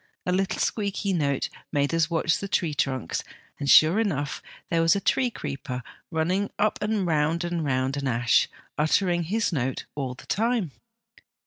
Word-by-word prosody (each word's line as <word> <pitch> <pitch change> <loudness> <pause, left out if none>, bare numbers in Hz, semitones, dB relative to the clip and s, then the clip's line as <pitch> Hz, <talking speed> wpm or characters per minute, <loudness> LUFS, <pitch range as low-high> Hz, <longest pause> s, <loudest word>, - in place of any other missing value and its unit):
A 180 - 0
little 190 +1 0
squeaky 200 -2 -1
note 140 -5 0 0.2
made 145 0 +1
us 165 0 +2
watch 165 -1 +1
the 200 - -4
tree 170 -5 0
trunks, 130 - -1 0.4
and, 140 -1 -2
sure 160 +7 +7
enough, 145 -10 -1 0.3
there 165 -1 +3
was 165 +4 +4
a - - +1
tree 250 +5 +2
creeper 135 - -5 0.3
running 180 +5 0
up 215 +1 +1
and 210 -2 0
round 160 +1 +1
and 175 -1 -2
round 130 -1 0
an 140 -1 -2
ash, 120 -1 +3 0.3
uttering 175 +3 +2
his 210 +2 0
note 130 -3 -2
all 130 -3 -3
the - - -14
time. 225 - 0
165 Hz, 165 wpm, -26 LUFS, 140-195 Hz, 0.4 s, sure